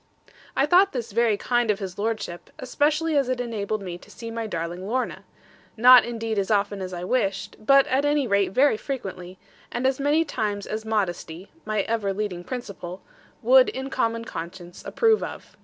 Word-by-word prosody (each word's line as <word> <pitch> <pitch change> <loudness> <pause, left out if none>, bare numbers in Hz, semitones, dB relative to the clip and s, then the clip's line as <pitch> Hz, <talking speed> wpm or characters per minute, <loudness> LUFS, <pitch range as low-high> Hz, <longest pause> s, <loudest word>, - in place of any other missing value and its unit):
I 275 - +4
thought 365 +6 +4
this 235 -4 -4
very 225 -1 +2
kind 240 0 0
of 210 - +2
his 190 -2 -7
lordship, 215 -5 -3
especially 300 +5 0
as 275 -3 +2
it 255 -1 -1
enabled 215 -3 -3
me 175 -2 -6
to - - -17
see 230 -1 -8
my 225 -1 -4
darling 175 0 -4
Lorna, 255 +4 -2 0.5
not 250 +2 +9
indeed 225 -2 -2
as 195 - -2
often 205 -1 +1
as 185 -1 -5
I 175 -1 -5
wished, 195 -2 -1
but 275 +4 +6
at 265 +2 +1
any 290 -1 +2
rate 200 -4 +1
very 260 +1 +3
frequently, 190 -9 -6 0.3
and 245 +2 -2
as 265 0 +1
many 295 +4 +2
times 205 -7 -2
as 215 +1 -5
modesty 190 -4 -3 0.2
(ever 215 0 -1
my 195 - +1
leading 190 -3 -4
principle) 195 -6 -7 0.4
would 255 +2 +6
in 265 +1 -5
common 230 -2 -1
conscience 175 -1 -8
approve 450 -2 +3
of. - - -8
220 Hz, 180 wpm, -24 LUFS, 195-255 Hz, 0.5 s, not